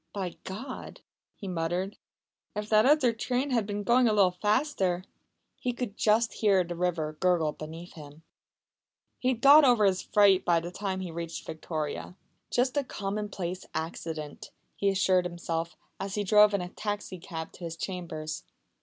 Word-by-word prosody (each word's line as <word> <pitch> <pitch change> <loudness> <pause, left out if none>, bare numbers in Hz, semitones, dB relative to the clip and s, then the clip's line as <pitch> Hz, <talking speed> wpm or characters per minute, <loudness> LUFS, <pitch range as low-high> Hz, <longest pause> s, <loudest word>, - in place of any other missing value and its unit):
"By 190 -4 -4
God!" 250 +8 -7 0.3
he 200 - -8
muttered. 180 +3 -2 0.6
"If 210 0 -4
that 215 +2 +5
other 275 -5 +4
train 250 +4 -1
had 230 -5 +1
been 205 0 -3
going 245 +2 +4
a 220 - +3
little 195 -3 +5
faster 195 -2 0 0.3
" - - -46
He 250 - -1
could 240 -4 -4
just 220 +2 +2
hear 200 -4 +3
the 175 0 -6
river 165 -3 -1
gurgling 175 -5 +2
beneath 165 +3 -9
him. 150 -2 -12 1.0
He 255 - -1
had 250 -3 +1
got 290 +3 +9
over 240 -6 +5
his 190 -2 +2
fright 200 -2 +4
by 170 -1 +3
the 170 +1 -6
time 190 0 -3
he 180 -2 -5
reached 170 0 -5
Victoria. 160 +1 -4 0.3
"Just 255 +3 +1
a 285 - +2
common 210 -3 -4
place 185 -2 -4
accident," 160 -2 -5 0.3
he 200 - +1
assured 185 -1 +3
himself, 170 -1 -3 0.2
as 195 0 -4
he 210 - 0
drove 210 +1 +6
in 200 - 0
a 180 - -5
taxi 205 -2 -4
cab 160 -2 -6
to 175 - -13
his 165 0 -5
chambers. 165 -2 -5
190 Hz, 170 wpm, -29 LUFS, 170-215 Hz, 1.0 s, got